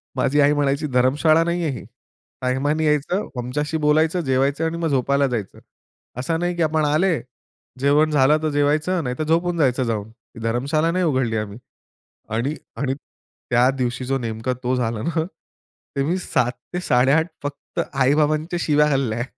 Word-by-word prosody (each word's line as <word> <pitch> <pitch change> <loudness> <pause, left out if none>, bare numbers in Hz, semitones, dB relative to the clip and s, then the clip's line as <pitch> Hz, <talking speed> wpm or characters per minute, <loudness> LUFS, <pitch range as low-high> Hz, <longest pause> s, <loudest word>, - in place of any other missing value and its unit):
माझी 145 +3 +1
आई 145 +1 +5
म्हणायची, 145 +1 0
"धर्मशाळा 145 +6 +3
नाहीये 170 -1 -1
ही. 125 - -7 0.6
टाईमानी 145 +5 0
यायचं, 150 +7 0
आमच्याशी 150 +6 -2
बोलायचं, 155 +3 +2
जेवायचं, 135 +2 +1
आणि 165 +1 -2
मग 170 -1 -1
झोपायला 140 0 +2
जायचं. 115 -6 -4 0.6
असा 160 +6 -1
नाही 175 +1 -1
की 170 - -2
आपण 155 -1 +1
आले, 160 +3 +2 0.6
जेवण 145 +3 +3
झालं 145 +1 +4
तर 155 - +1
जेवायचं 150 +5 +1
नाहीतर 125 +3 -2
झोपून 170 +2 +1
जायचं 130 -4 +2
जाऊन. 110 -3 -2
ही 115 0 -18
धर्मशाला 140 +8 +1
नाही 180 +1 +1
उघडली 130 -7 +1
आम्ही." 105 -1 -4 0.8
आणि 135 +7 -1 0.2
आणि 135 +1 -1
त्या 125 -3 -2
दिवशी 125 0 -2
जो 135 +1 0
नेमका 115 +1 -3
तो 125 +1 +1
झाला 115 -3 -1
ना 165 +1 0 0.7
ते 140 - +1
मी 170 +6 0
7:00-8:30 135 0 +1 0.2
फक्त 145 0 -6
आई-बाबांच्या 150 +5 +1
शिव्या 150 0 +3
खाल्ल्या 120 -5 0
145 Hz, 150 wpm, -22 LUFS, 125-155 Hz, 0.8 s, आई